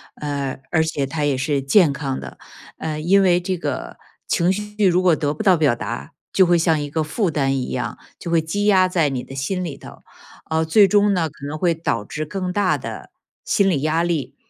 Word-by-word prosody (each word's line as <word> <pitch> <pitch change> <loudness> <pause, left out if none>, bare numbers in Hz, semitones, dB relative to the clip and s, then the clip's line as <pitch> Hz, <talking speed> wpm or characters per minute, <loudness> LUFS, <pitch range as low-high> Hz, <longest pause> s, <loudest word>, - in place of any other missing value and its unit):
呃， 140 -3 -4
而 160 - +3
且 155 -3 -2
它 150 +3 -3
也 140 -2 +1
是 140 +1 0
健 145 +3 +4
康 140 -2 -3
的。 - - -9 0.4
呃， 155 -1 -4
因 185 +6 +4
为 180 -2 +4
这 180 +1 -3
个 175 - -5 0.3
情 175 +1 +2
绪 210 +2 -5
如 180 -1 +4
果 180 -3 +4
得 145 -2 -1
不 220 - -5
到 190 -3 +5
表 150 -7 +2
达， - - -6 0.2
就 190 - +5
会 175 0 +4
像 165 -2 +2
一 145 - -4
个 155 +2 -1
负 180 +6 -1
担 135 -3 0
一 130 - -3
样， 120 -2 -3 0.2
就 170 - -6
会 165 -1 +3
积 200 +6 -2
压 190 -3 +5
在 170 -4 +2
你 130 -2 -3
的 - - -11
心 180 +8 -2
里 150 -6 -5
头。 - - -12 0.5
呃， 160 0 +1
最 200 +5 +5
终 205 0 +3
呢， 165 -4 0
可 140 - -12
能 150 +2 -4
会 170 +1 +2
导 135 -9 -2
致 155 +8 -5
更 185 +3 -4
大 195 -1 +1
的 - - -8 0.3
心 200 -1 +2
理 150 -7 0
压 155 +3 +1
力， 165 -7 -2
160 Hz, 240 characters per minute, -21 LUFS, 145-185 Hz, 0.5 s, 到